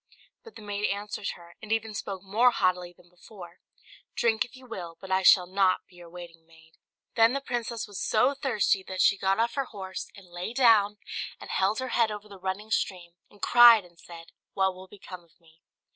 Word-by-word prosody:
But 455 - -15
the 215 - -11
maid 205 0 -2
answered 205 0 -4
her, 170 0 -16
and 220 - -9
even 225 -1 -1
spoke 195 -2 -6
more 220 +6 +3
haughtily 180 -5 0
than 175 0 -23
before, 180 0 -14 0.6
"Drink, 225 -2 +2
if 245 - -14
you 260 0 -15
will, 175 -8 -8
but 190 -1 -10
I 190 0 +2
shall 180 0 +6
not 190 0 +1
be 180 - -21
your 175 -1 -13
waiting 170 -1 -12
maid." 160 0 -21 0.4
Then 230 +1 +4
the 275 - -1
princess 240 -4 -4
was 205 -2 -7
so 250 +6 +2
thirsty 235 -8 0
that 185 -1 -6
she 200 - +5
got 195 0 0
off 235 +1 +1
her 275 -1 -2
horse 190 -5 -7
and 195 - -14
lay 175 +5 -7
down, 220 -5 +4 0.4
and - - -9
held 195 +3 +1
her 260 0 -3
head 230 -3 +2
over 210 0 -7
the 200 -2 -13
running 190 +4 -5
stream, 180 -5 -2 0.2
and 205 - -22
cried, 235 -4 +7
and 170 -1 -21
said, 165 0 -13 0.2
"What 190 -1 +1
will 185 +1 -13
become 185 -2 -11
of 170 +1 -30
me?" 165 -1 -25
195 Hz, 210 wpm, -27 LUFS, 180-225 Hz, 0.6 s, cried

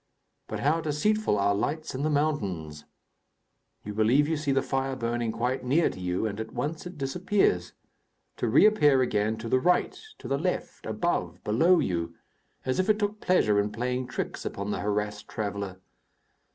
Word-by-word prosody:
But - - -4
how 155 +4 +2
deceitful 160 - +1
are 100 0 +2
lights 150 +10 -2
in 130 - -3
the 155 - +1
mountains! 95 - -1 1.0
You 105 - -5
believe 120 +8 +3
you 160 - 0
see 150 -2 -1
the 135 0 +2
fire 135 0 -1
burning 120 -2 -1
quite 125 +4 -1
near 145 +7 +2
to - - -10
you 90 +3 -1
and 105 -1 -3
at 110 0 -6
once 150 +8 -3
it 175 -2 -10
disappears, 140 - +1 0.6
to - - -1
reappear 145 - +5
again, 110 -1 0
to 115 +1 -6
the 130 - +3
right, 180 +6 +2 0.2
to - - -9
the 140 0 0
left, 180 +3 -3
above, 90 - -2
below 165 +13 +4
you, 85 - -1 0.5
as 130 +4 0
if 185 - +1
it 215 - +4
took 210 0 -2
pleasure 105 - +3
in 105 +1 0
playing 125 +2 -2
tricks 125 - -4
upon 100 +1 -4
the - - -2
harassed 105 0 -2
traveller. 100 -3 -4
125 Hz, 175 wpm, -27 LUFS, 105-155 Hz, 1.0 s, reappear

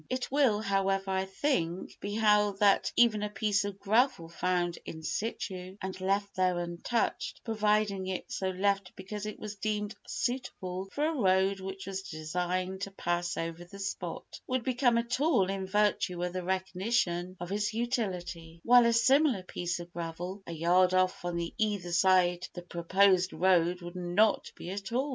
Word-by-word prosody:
It 255 0 -2
will, 260 -7 +3
however, 195 -1 0
I 190 0 0
think, 190 - -2
be 205 +1 -4
held 210 -2 +3
that 200 -1 +4
even 230 -3 +4
a 210 - -1
piece 205 -1 +1
of 200 -1 -5
gravel 220 -5 +2
found 175 0 -1
in 160 0 -8
situ 185 -1 -4
and 190 -1 -6
left 200 +1 0
there 185 -1 +2
untouched, 175 +7 -2
provided 210 -3 +1
it 185 -1 -3
is - - -8
so 190 - -1
left 195 0 0
because 205 +2 -6
it 215 - -6
was 210 -1 -7
deemed 210 0 -2
suitable 195 -7 -3
for 295 +6 0
a 320 - +1
road 195 -6 +2
which 190 0 -6
was 195 -1 -4
designed 180 +3 -3
to 200 - -3
pass 175 -2 -2
over 165 +1 -4
the 175 +3 -12
spot, 195 -3 -5
would 255 -1 -1
become 245 -2 +2
a 235 - +2
tool 245 - +2
in 195 -1 -3
virtue 195 -3 +1
of 180 0 -2
the 185 - -2
recognition 185 -1 -1
of 175 +1 -6
its 210 +1 0
utility, 185 -8 -3
while 245 0 +7
a 235 - +3
similar 260 -2 +4
piece 175 -1 -3
of 175 0 -10
gravel 175 +3 -5
a - - -5
yard 180 +3 +3
off 185 -1 +1
on 175 -1 -2 0.2
either 205 -5 0
side 180 0 +3
the 175 - -6
proposed 185 +2 +2
road 175 0 +2
would 175 +1 -8
not 180 +5 +2
be 175 - -7
a 195 - -3
tool. 240 +8 -2
190 Hz, 175 wpm, -30 LUFS, 180-210 Hz, 0.2 s, while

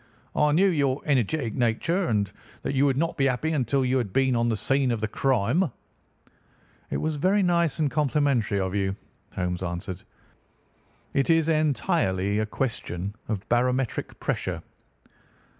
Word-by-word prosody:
"I 150 0 +3
knew 175 +6 +4
your 140 -5 0
energetic 130 -3 +1
nature, 145 - +1
and 105 -3 0 0.3
that - - -2
you 135 +1 +3
would 135 -2 +1
not 165 +3 0
be 135 - +3
happy 135 +5 0
until 135 -2 +1
you 130 +1 +2
had 110 -6 -3
been 130 +2 +2
on 120 0 +2
the 110 - 0
scene 135 +5 +1
of 115 -2 0
the 110 - -1
crime." 135 - +1 1.2
"It - - -1
was 155 -1 -2
very 195 +6 +3
nice 170 -3 +2
and 150 -4 +1
complimentary 135 -7 +1
of 95 -1 -1
you," 95 -1 0 0.4
Holmes 90 -1 -2
answered. 90 +1 -4 1.1
"It 140 +2 +1
is 165 -1 +4
entirely 105 - +1
a 110 - 0
question 100 -6 -3
of 105 -3 -3
barometric 125 +1 0
pressure." - - -2
130 Hz, 155 wpm, -26 LUFS, 105-150 Hz, 1.2 s, knew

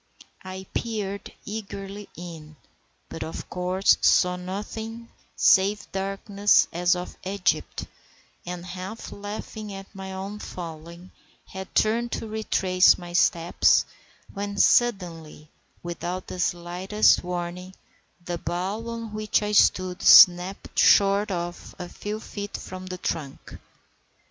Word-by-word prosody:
I 190 0 -7
peered 205 -4 -3
eagerly 200 -1 -7
in, 160 -3 -9 0.5
but 165 - -8
of 160 - -7
course 180 +2 +2
saw 180 -1 +4
nothing 220 +5 -6 0.3
save 200 +2 +3
darkness 195 +1 +2
as 175 +1 +2
of 180 0 -6
Egypt, 190 -2 -1 0.6
and, 175 0 -6
half 185 +5 -7
laughing 205 +1 -7
at 195 +1 -9
my 190 -1 -7
own 195 +2 -6
folly 170 0 -9 0.4
had 190 0 -8
turned 235 +2 +2
to - - -3
retrace 190 -4 +3
my 175 -1 -9
steps, 170 -1 +3 0.5
when 200 0 -4
suddenly, 170 -10 +1 0.3
without 175 +1 -4
the 185 - -8
slightest 180 +4 +2
warning, 180 +1 -5 0.5
the 175 -1 -3
bough 180 +6 -3
on 230 -2 -6
which 215 0 0
I 210 - -2
stood 185 -3 +3
snapped 180 0 +6
short 200 +1 +5
off 175 -2 -5
a 180 - -6
few 210 +4 -6
feet 205 -2 -6
from 185 0 -8
the 185 0 -5
trunk. 155 -6 -5
190 Hz, 120 wpm, -25 LUFS, 175-205 Hz, 0.6 s, snapped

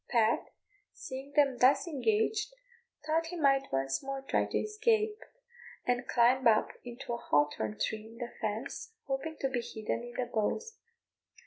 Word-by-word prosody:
Pat, 230 -2 +3 0.5
seeing 270 +1 -7
them 280 -4 +3
thus 255 +3 +5
engaged, 290 - 0 0.5
thought 325 +1 +1
he 355 - -5
might 275 -4 +3
once 135 0 0
more 270 0 -4
try - - +1
to - - -1
escape, 430 0 +1 0.7
and 245 0 0
climbed 245 +1 +4
up 215 -1 +4
into 240 0 -6
a - - -1
hawthorn 145 - +1
tree 220 0 -2
in 225 +1 -13
the 240 -1 -5
fence, 225 - -3
hoping 285 +4 -3
to 270 - +1
be 250 -2 -1
hidden 220 0 -3
in 240 0 -8
the 250 - 0
boughs. 340 - -2
255 Hz, 155 wpm, -32 LUFS, 225-305 Hz, 0.7 s, thus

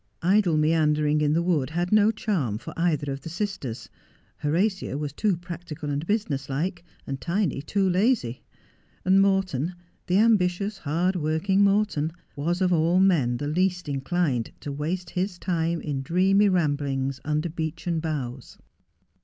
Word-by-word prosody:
Idle 185 -3 +3
meandering 150 -1 +2
in 150 0 +2
the 170 +2 +2
wood 165 -7 +1
had 175 +3 -2
no 210 0 +5
charm 180 - -1
for - - -9
either 155 -4 0
of 135 0 -5
the 165 - -7
sisters. 170 - -4 0.5
Horatia 180 +1 0
was 145 -2 -4
too 200 +1 +1
practical 170 -4 -6
and 145 +3 -3
business 155 -11 -1
like, 170 +6 -2 0.4
Tiny 170 +1 -1
too 195 +6 0
lazy. 185 - +1 0.6
And 190 +1 +5
Morton, 185 -5 +1 0.3
the 180 - +3
ambitious, 200 -2 +2
hard 175 +5 0
working 180 +5 +1
Morton, 200 -6 +2 0.2
was 170 +6 -1
of 180 -1 +3
all 170 +2 +3
men 155 -11 +3
the 145 +3 -3
least 180 +3 0
inclined 140 -3 -1
to 145 - -5
waste 165 +5 -3
his 185 0 -2
time 170 -2 -1
in 140 -3 -3
dreamy 190 +7 +3
ramblings 140 -6 0
under 155 +2 -1
beechen 160 +1 -3
boughs. 135 -6 -5
170 Hz, 145 wpm, -25 LUFS, 145-185 Hz, 0.6 s, no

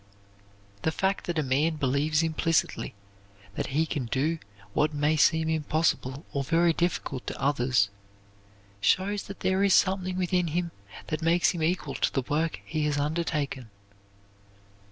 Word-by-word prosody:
The 160 - +1
fact 195 +3 -1
that 175 -1 -2
a 155 - +2
man 145 +5 +1
believes 150 +3 +1
implicitly 165 - 0 0.6
that - - -3
he 150 +4 +1
can 145 -6 -3
do 150 +7 0 0.3
what 150 0 +1
may 150 +2 +2
seem 160 +1 +3
impossible 155 -3 0
or 140 - 0
very 165 +3 +3
difficult 160 -6 -2
to - - -4
others, 125 -7 +2 0.9
shows 195 - +2
that 195 - -9
there 190 +1 +2
is 200 -2 +5
something 185 -1 +2
within 180 -1 +1
him 170 +2 -1 0.4
that 155 +1 -2
makes 170 +2 +3
him 175 - -5
equal 160 -3 0
to - - 0
the 135 - -1
work 155 +5 -1
he 155 -1 -1
has 150 -1 0
undertaken. 145 -4 -2
160 Hz, 150 wpm, -27 LUFS, 145-170 Hz, 0.9 s, is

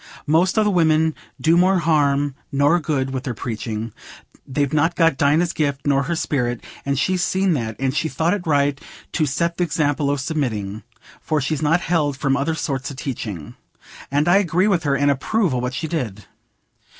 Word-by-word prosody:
Most 170 +6 +2
o' 215 - +5
the 210 - +2
women 160 -3 +3 0.3
do 160 +1 +3
more 185 +2 +4
harm 145 -4 +2 0.2
nor 145 +5 +3
good 140 -5 -1
with 130 -1 -3
their 130 -5 -4
preaching—they've 115 +5 -5
not 165 +3 +2
got 165 -4 +3
Dinah's 150 +5 +2
gift 140 -3 -1
nor 140 -1 +3
her 165 +5 -2
sperrit—and 135 -1 -2
she's 185 +6 +1
seen 190 -1 +1
that, 115 -6 -2
and 135 0 -1
she 160 +1 0
thought 165 +3 0
it 190 -5 -4
right 145 -1 +2 0.3
to 155 -3 0
set 170 +5 -1
th' - - -2
example 145 -3 0
o' 145 - +2
submitting, 120 -9 -3 0.4
for 155 -1 0
she's 145 +2 -2
not 165 +3 +2
held 150 -5 0
from 135 0 +1
other 140 +3 0
sorts 135 -4 -3
o' - - -8
teaching. 110 - -5 0.6
And 145 +3 +1
I 175 +3 +6
agree 185 0 +2
with 175 -6 +1
her, 140 -1 +2
and 145 0 +3
approve 175 +5 0
o' 125 - 0
what 125 +1 -3
she 160 +2 -3
did." 120 - -4
145 Hz, 185 wpm, -21 LUFS, 135-165 Hz, 0.6 s, I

